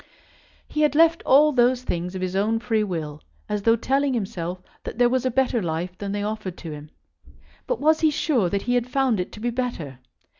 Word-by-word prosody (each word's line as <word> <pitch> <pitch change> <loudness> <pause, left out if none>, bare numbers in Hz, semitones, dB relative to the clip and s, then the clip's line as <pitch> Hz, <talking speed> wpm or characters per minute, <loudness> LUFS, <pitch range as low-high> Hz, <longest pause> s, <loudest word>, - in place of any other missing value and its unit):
He 305 - -2
had 300 -1 +3
left 330 +1 +5
all 295 +3 +6
those 250 -1 +2
things 180 -3 -3
of 185 - -3
his 185 0 -3
own 215 +3 +1
free 225 -1 0
will, 155 -6 -4 0.3
as 210 -1 -2
though 230 +3 +4
telling 270 +3 0
himself 185 -5 -3 0.2
that - - -7
there 245 0 +4
was 255 0 +1
a - - +2
better 255 -2 +1
life 175 +1 -3
than 200 -1 -4
they 205 0 -2
offered 210 -4 -4
to 165 - -7
him. 150 0 -9 0.8
But - - -1
was 310 +2 +3
he 315 - +4
sure 280 - +1
that 200 +2 -1
he 245 - 0
had 245 0 0
found 260 -5 +1
it 180 - -3
to - - -9
be 240 +2 -1
better? 230 - -4
225 Hz, 220 wpm, -24 LUFS, 185-260 Hz, 0.8 s, all